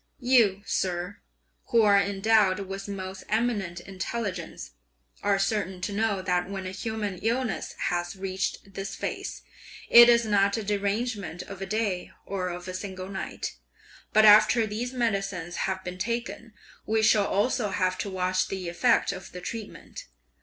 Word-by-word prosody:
"You, 235 -7 +3
sir, 180 +1 -2 0.5
who 230 -1 +3
are 200 -1 +6
endowed 200 -1 +2
with 195 +1 -6
most 190 -1 -6
eminent 210 -6 0
intelligence 190 -1 -5 0.5
(are 200 -1 +2
certain 195 -2 -1
to 200 - -3
know) 205 -2 0
that 180 -1 0
when 195 -1 -5
a 185 - -4
human 205 -1 -4
illness 235 -1 -1
has 175 0 -1
reached 195 +1 -4
this 195 +1 -5
phase, - - -5 0.5
it 235 0 +10
is 235 -1 +5
not 200 0 +2
a 220 - -3
derangement 200 -3 -2
of 195 +1 -10
a 195 - -3
day 205 -3 -1 0.2
or 185 -2 -3
of 175 +1 -6
a 185 - -5
single 185 0 -6
night; 195 -1 -5 0.5
but 215 0 +6
after 215 +2 +7
these 220 +4 -4
medicines 195 -8 -2
have 190 0 -3
been 180 0 -6
taken, 230 +1 -3 0.3
we 220 0 +2
shall 215 -2 +4
also 215 +2 +1
have 185 -1 0
to 200 - -2
watch 185 0 0
the 185 -3 -4
effect 230 +8 +2
of 190 -1 -8
the 180 - -6
treatment! 225 - -8
200 Hz, 155 wpm, -27 LUFS, 185-220 Hz, 0.5 s, it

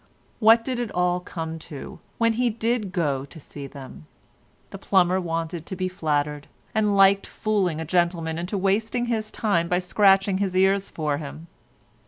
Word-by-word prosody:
What 225 +1 +6
did 255 -2 -2
it 240 -2 -2
all 180 0 +1
come 165 -2 -6
to, 145 -3 -8 0.2
when 230 0 +3
he 245 +2 +1
did 230 -2 -1
go 145 -8 0
to 160 +3 -13
see 140 -1 -9
them? 130 - -11 0.6
The 195 - -8
plumber 185 -1 +2
wanted 165 -1 -4
to 190 - -5
be 185 0 -2
flattered, 150 -5 -2 0.3
and 210 -2 +2
liked 195 0 +5
fooling 195 -7 -1
a 160 - -4
gentleman 170 -1 0
into 180 +4 -3
wasting 220 +5 0
his 220 -2 -2
time 185 -6 0
by 180 - +1
scratching 195 +1 +3
his 190 -2 -1
ears 195 +1 +3
for 150 -3 -2
him. 155 +2 -8
185 Hz, 170 wpm, -24 LUFS, 160-205 Hz, 0.6 s, What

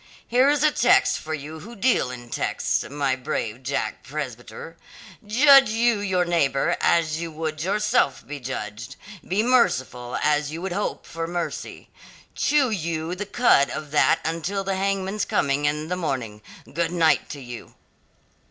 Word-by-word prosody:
Here 255 +4 +4
is 295 0 +2
a 305 - +5
text 245 -2 +3
for 155 0 -4
you 155 +2 -8
who 230 +9 -11
deal 230 - +2
in 120 -1 -9
texts, - - -1
my 140 -2 0
brave 125 -2 -4
Jack 135 +2 -3
Presbyter 130 0 -7 0.5
'Judge 270 +4 +6
you 230 0 +2
your 190 -3 0
neighbour 170 -1 +1
as 160 -2 +2
you 165 -1 -5
would 155 0 -4
yourself 210 - +1
be 145 0 -7
judged; 115 -3 -6 0.3
be 195 +4 +1
merciful 130 - +1
as 150 -1 +1
you 160 - -5
would 190 - -3
hope 205 +3 -3
for 165 0 -5
mercy.' 175 0 -5 0.4
Chew 280 -4 +2
you 165 -3 -2
the 200 +2 -5
cud 200 - +4
of 150 -2 -6
that 150 - +4
until 170 +5 -2
the 195 0 -1
hangman's 195 +1 -1
coming 140 +1 0
in 150 +1 -1
the 180 - -2
morning. 130 -11 -3 0.3
Good 170 0 0
night 165 -3 +2
to 145 - -7
you." 120 -3 -10
165 Hz, 160 wpm, -24 LUFS, 140-205 Hz, 0.5 s, Judge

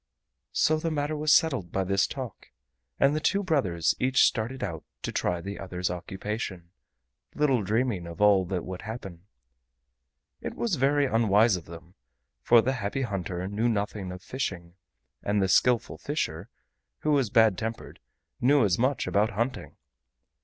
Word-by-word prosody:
So 155 - +3
the 165 - -1
matter 150 0 -1
was 150 0 +1
settled 135 - +3
by 95 - 0
this 100 +1 +2
talk, 130 -4 -7 0.5
and 140 +2 +4
the - - +1
two 200 +6 +1
brothers 100 - +1
each 130 0 +4
started 120 +3 -1
out 85 -6 -4 0.2
to - - -2
try 90 -1 -1
the 100 +3 -6
other's 90 -1 -3
occupation, 95 0 -5 0.6
little 135 -6 +2
dreaming 105 -3 -1
of 85 +2 -9
all 105 -2 +5
that 90 -1 -3
would 90 0 -6
happen. 100 -5 -8 1.1
It - - -5
was 235 -4 -2
very 140 +2 +3
unwise 115 -3 +3
of 90 - -7
them, 85 +1 -12 0.5
for 115 - +5
the 130 - +1
Happy 125 +2 -2
Hunter 95 -4 -3
knew 105 +4 0
nothing 100 -3 -2
of 90 +1 -9
fishing, 90 -10 -4 0.5
and 100 0 0
the 95 - +2
Skillful 120 +5 +2
Fisher, 105 - -3 0.5
who 155 - +1
was 135 -6 +2
bad 110 -2 +5
tempered, 110 +4 -6 0.4
knew 135 -1 +4
as 95 -1 +1
much 130 +3 +1
about 105 +2 +2
hunting. 115 +5 -3
105 Hz, 160 wpm, -27 LUFS, 95-130 Hz, 1.1 s, all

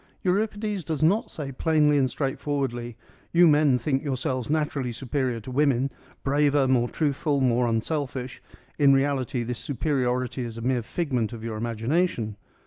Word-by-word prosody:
Euripides 205 +1 0
does 155 -1 -2
not 195 +8 +3
say 140 -3 -6
plainly 150 +1 +2
and 135 -2 +3
straightforwardly 135 -3 -3 0.2
' - - -32
You 175 0 +7
men 150 -4 +4
think 135 +2 -1
yourselves 130 -2 -2
naturally 150 -4 0
superior 125 0 -2
to 130 - -8
women: 135 -1 +2 0.3
braver, 145 0 +3
more 120 -2 +2
truthful, 145 -1 0
more 125 -2 +2
unselfish: 130 +2 -2 0.4
in 140 -1 +6
reality 135 -3 +1
this 120 0 -4
superi 140 0 -1
ority 125 +1 -1
is 115 -1 -6
a - - -6
mere 125 +1 +1
figment 125 -3 -2
of 115 -1 -8
your 115 -1 -4
imagination.' 115 - -1
135 Hz, 155 wpm, -26 LUFS, 120-150 Hz, 0.4 s, You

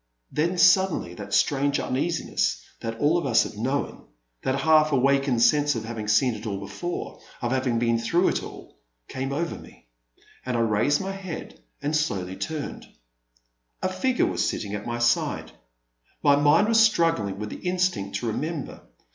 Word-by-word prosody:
Then 170 +4 0
suddenly 175 - +4
that 100 +2 -9
strange 140 +5 +2
uneasiness 160 +6 -1 0.2
that 115 0 -5
all 165 +4 +2
have 115 -4 +2
known 130 - -3 0.2
— - - -49
that 135 +1 -1
half 155 +1 +4
awakened 135 -2 +2
sense 145 0 +3
of 110 -1 -4
having 110 -2 -5
seen 115 +4 +3
it 110 +1 -7
all 100 -2 -2
before, 175 - -5 0.2
of 120 - -2
having 130 -2 0
been 115 0 +1
through 170 +11 +2
it - - -1
all, - - -11 0.3
came 135 +1 -4
over 165 +4 -2
me, - - -17 0.5
and 125 -2 -2
I - - +2
raised 115 - +2
my 195 0 -3
head 190 -4 -7 0.2
and 150 +2 0
slowly 95 - -1
turned. 155 +6 -5 1.0
A - - +1
figure 245 +7 +1
was - - -1
seated 100 -1 -2
at 105 +1 -5
my 120 0 -2
side. 120 0 0 0.7
My 145 -1 +6
mind 145 +8 +4
was 225 0 +4
struggling 165 - +2
with 105 +1 -5
the - - -6
instinct 180 - -1
to - - -4
remember. 150 +7 -4
135 Hz, 165 wpm, -25 LUFS, 115-165 Hz, 1.0 s, My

